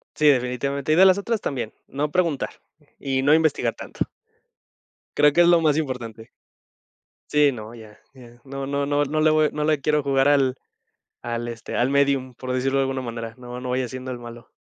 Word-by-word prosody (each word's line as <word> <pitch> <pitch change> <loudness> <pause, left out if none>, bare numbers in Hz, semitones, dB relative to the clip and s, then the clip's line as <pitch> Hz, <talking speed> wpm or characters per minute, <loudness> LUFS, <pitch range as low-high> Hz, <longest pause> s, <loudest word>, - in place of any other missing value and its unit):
Sí, 150 -1 +4
definitivamente. 140 +3 0
Y - - +5
de 190 - +7
las 185 +1 +5
otras 220 +2 -2
también, 120 -6 -4 0.2
no 145 +2 -2
preguntar, 170 -6 0 0.5
y 135 -1 -1
no 145 +2 +4
investigar 160 -2 +1
tanto. - - -4 1.1
Creo 150 0 +5
que 175 +4 +5
es - - +4
lo 170 -1 +5
más 155 -2 +2
importante. 120 -7 -4 1.0
Sí, 150 -1 +4
no, 110 -1 -9
ya 110 -2 -13 0.2
ya, 120 -2 -16
no 135 0 -6
no 140 +1 -1
no 145 0 +1
no 155 +2 -1
le 155 - +4
voy 155 -1 +3
no 150 - -2
le 155 -1 +1
quiero 150 +1 +1
jugar 135 0 +2
al 135 -3 +3 0.7
al, 120 0 -4
este, 115 -1 -7
al 125 +2 +2
médium, 140 -2 +1
por 130 +1 -5
decirlo 135 +2 0
de - - +3
alguna 135 0 -2
manera, 115 -2 -6
no 125 0 -8
no 125 - -6
vaya 125 0 0
siendo 130 +1 -6
el 125 - -6
malo. 120 0 -11
135 Hz, 200 wpm, -23 LUFS, 125-150 Hz, 1.1 s, de